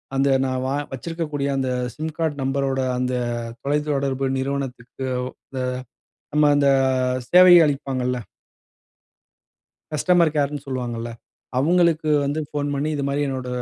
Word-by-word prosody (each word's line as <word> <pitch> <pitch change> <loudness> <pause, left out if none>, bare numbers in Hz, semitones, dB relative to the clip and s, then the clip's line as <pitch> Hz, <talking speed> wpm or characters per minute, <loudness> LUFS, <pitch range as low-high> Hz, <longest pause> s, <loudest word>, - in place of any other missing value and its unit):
அந்த 135 +1 +2 0.2
நான் 130 -1 -1
வ - - -1 0.2
வச்சிருக்கக்கூடிய 150 +1 -3
அந்த 130 -1 0 0.3
சிம் 155 +1 -4
கார்ட் 160 -3 -1
நம்பரோட 135 0 0 0.2
அந்த 125 0 -1 0.5
தொலைத்தொடர்பு 140 -2 0
நிறுவனத்துக்கு 130 -2 -4 0.5
த - - -2 0.8
நம்ம 150 0 +5
அந்த 140 -1 +3 0.6
சேவைய 175 -2 +8
அளிப்பாங்கல்ல. 130 -3 -1 1.7
கஸ்டமர் 170 +1 +3
கேர்ன்னு 145 0 -1
சொல்லுவாங்கல்ல. 120 -3 -4 0.5
அவுங்களுக்கு 165 +1 +3
வந்து 145 +3 -1
ஃபோன் 145 -1 -2
பண்ணி, 140 +2 -1
இது 145 - -2
மாரி 140 +1 -1
என்னோட 130 -2 -4
140 Hz, 115 wpm, -22 LUFS, 130-150 Hz, 1.7 s, சேவைய